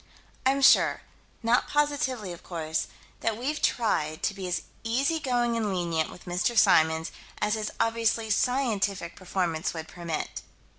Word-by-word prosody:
I'm 275 +1 +2
sure - - +6 0.4
not 230 +2 +3
positively, 285 -9 0
of 170 - -11
course 160 -2 -3 0.3
that 225 -1 -1
we've 285 +6 -2
tried 155 -10 0
to 215 - +1
be 195 -2 -5
as 180 - -1 0.2
easygoing 245 -1 +1
and 220 -3 0
lenient 170 -4 0
with 180 - -13
Mr. 180 +6 0
Symons 160 -4 +4 0.3
as 210 - +1
his 215 -1 -1
obviously 225 -1 +1
scientific 205 -8 0
performance 175 -4 -2
would 160 -1 -5
permit. 170 -3 -4
210 Hz, 140 wpm, -27 LUFS, 175-240 Hz, 0.4 s, sure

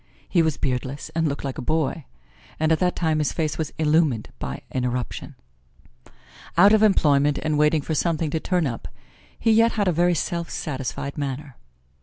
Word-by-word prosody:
He 175 - +3
was 160 -3 0
beardless 135 +3 -3
and 165 0 +1
looked 140 -1 -3
like 135 -2 -4
a - - -3
boy, 155 +1 -1 0.5
and 155 +1 +2
at 160 - +3
that 180 -1 +1
time 160 -2 +1
his 150 - +1
face 155 -2 -2
was 160 - -2
illumined 150 -7 +2
by 65 - -5
an 130 - -1
eruption. 125 -1 -3 1.2
Out 200 +5 +7
of 215 - +5
employment 145 -8 +4
and 155 -1 0
waiting 150 0 +3
for 160 - -3
something 160 0 0
to 160 - 0
turn 180 0 0
up, 120 -4 -4 0.5
he 225 - +2
yet 225 +1 +4
had 205 -3 0
a - - +4
very 175 +1 +2
self 170 +2 -2
satisfied 140 0 -4
manner. 140 -1 -4
155 Hz, 185 wpm, -24 LUFS, 140-170 Hz, 1.2 s, Out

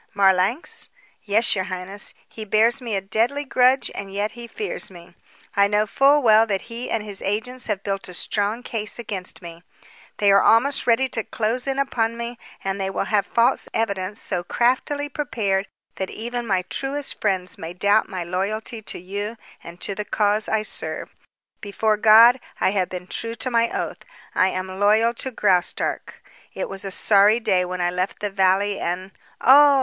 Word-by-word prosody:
"Marlanx?" 195 - +2 0.3
"Yes, 220 +3 +3
your 190 -2 -1
highness. 185 +2 -3
He 220 - -9
bears 225 +5 +2
me 230 -4 -3
a 195 - 0
deadly 230 +9 0
grudge 260 0 +3
and 200 -1 -6
yet 205 +2 -2
he 235 +1 -9
fears 445 - -3
me. 175 -1 -14 0.4
I 200 0 +5
know 210 +1 +2
full 275 +6 +3
well 220 -1 +6
that 195 -3 -1
he 240 +2 -5
and 225 - -1
his 205 -2 -6
agents 245 +6 -2
have 200 -3 -2
built 195 -1 -3
a 180 - -6
strong 210 +6 -1
case 215 -3 -4
against 195 -6 -4
me. 170 0 -10 0.6
They 205 -1 +4
are 195 - +6
almost 265 +5 +3
ready 240 +3 +3
to 225 - -2
close 230 +5 -2
in 270 0 -1
upon 230 -4 0
me, 235 0 -6 0.2
and 195 0 -2
they 190 - -1
will 195 - -2
have 205 -1 +2
false 235 0 +2
evidence 200 -2 -1
so 180 -3 -1
craftily 260 +8 0
prepared 215 -9 -1 0.3
that 190 - -3
even 240 +1 -5
my 190 -3 +1
truest 275 +8 -4
friends 185 -2 -1
may 165 - -6
doubt 205 +3 +2
my 185 -2 -4
loyalty 205 +6 -3
to - - -6
you 205 +5 -5 0.3
and 170 +1 -11
to 200 - -2
the 210 +2 -4
cause 210 +1 +1
I 220 -1 +1
serve. - - -3 0.5
Before 215 +1 0
God, 225 +4 +7 0.2
I - - +2
have 190 -3 0
been 180 -1 -6
true 230 +5 -4
to 255 - -3
my 230 0 +2
oath. - - -4 0.3
I 185 - +3
am 185 0 -4
loyal 215 +3 +4
to 265 - -4
Graustark. 190 -7 -1 0.3
It - - -3
was 195 0 -7
a 195 - -4
sorry 205 +3 +4
day 185 -5 +2
when 180 0 -4
I 175 0 +1
left 180 +2 -2
the 205 -1 -3
valley 195 +1 +2
and 185 +2 -3 0.2
" - - -32
"Oh!" 280 +1 +7
210 Hz, 185 wpm, -22 LUFS, 190-235 Hz, 0.6 s, God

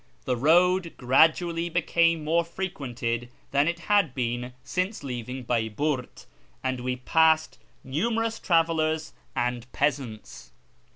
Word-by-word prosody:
The 125 - +1
road 175 +6 +3
gradually 165 +6 +3
became 165 -1 +2
more 165 +3 +2
frequented 130 -10 -4 0.2
than 140 +2 +3
it 170 0 -2
had 200 -10 +2
been 125 0 -2
since 185 0 -2
leaving 125 0 -5
Baiburt, 120 +4 -2 0.4
and 130 -1 -1
we 125 +1 -2
passed 160 +4 +2 0.2
numerous 225 - -1
travellers 160 -2 +1 0.2
and 125 -1 -2
peasants. 120 - -3
150 Hz, 110 wpm, -26 LUFS, 125-170 Hz, 0.4 s, road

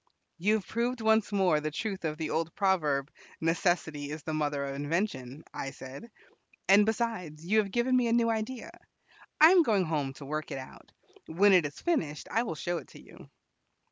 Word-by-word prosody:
"You 210 +5 +3
have 215 - -3
proved 240 +2 -1
once 220 -1 +2
more 185 -6 +3
the 155 +1 -2
truth 190 +3 -4
of 155 -1 -2
the 155 -1 -3
old 165 0 -2
proverb, 155 -8 +1 0.3
'Necessity 160 -3 0
is 150 0 -6
the 160 - -4
mother 145 -2 -1
of 140 - -4
invention,'" 145 - -3
I 135 - -4
said. 135 - -10 0.6
"And, 205 +2 +6
besides, 210 -9 -2
you 215 +5 +3
have 205 -2 0
given 240 +5 +1
me 250 -2 +3
a - - 0
new 230 -1 +3
idea. 225 +3 -4 0.7
I 315 +3 +9
am 370 -1 +7
going 210 - +2
home 145 -4 -2
to 140 - -11
work 155 +2 -4
it - - -4
out. 130 0 -11 0.4
When 195 +5 +4
it 175 -5 +5
is 145 - -12
finished, 160 - -1
I 225 - +2
will 225 -9 -3
show 175 +2 -2
it - - -13
to - - -14
you." - - -15
175 Hz, 200 wpm, -29 LUFS, 150-220 Hz, 0.7 s, I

